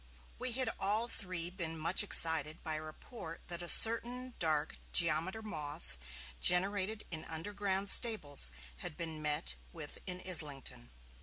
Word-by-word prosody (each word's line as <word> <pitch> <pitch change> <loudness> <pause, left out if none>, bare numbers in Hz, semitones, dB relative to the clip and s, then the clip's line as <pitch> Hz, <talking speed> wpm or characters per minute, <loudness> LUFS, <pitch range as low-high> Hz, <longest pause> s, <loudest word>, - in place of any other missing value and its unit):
We 255 -1 -2
had 260 +1 0
all 210 +4 -1
three 180 -6 -4
been 170 -3 -6
much 165 +4 +4
excited 160 -5 +2
by 160 - -4
a 155 - -4
report 165 +2 -9
that 175 0 -2
a 175 - -8
certain 245 +3 +5
dark 155 -2 -1
geometer 170 +6 +2
moth, 150 - -6 0.4
generated 200 +4 +2
in 160 -2 -4
underground 195 +4 -4
stables, 195 - +5 0.3
had 150 - -5
been 160 -3 -5
met 150 - -2 0.2
with - - -10
in 180 -1 -3
Islington. 145 - -2
175 Hz, 140 wpm, -33 LUFS, 155-205 Hz, 0.4 s, certain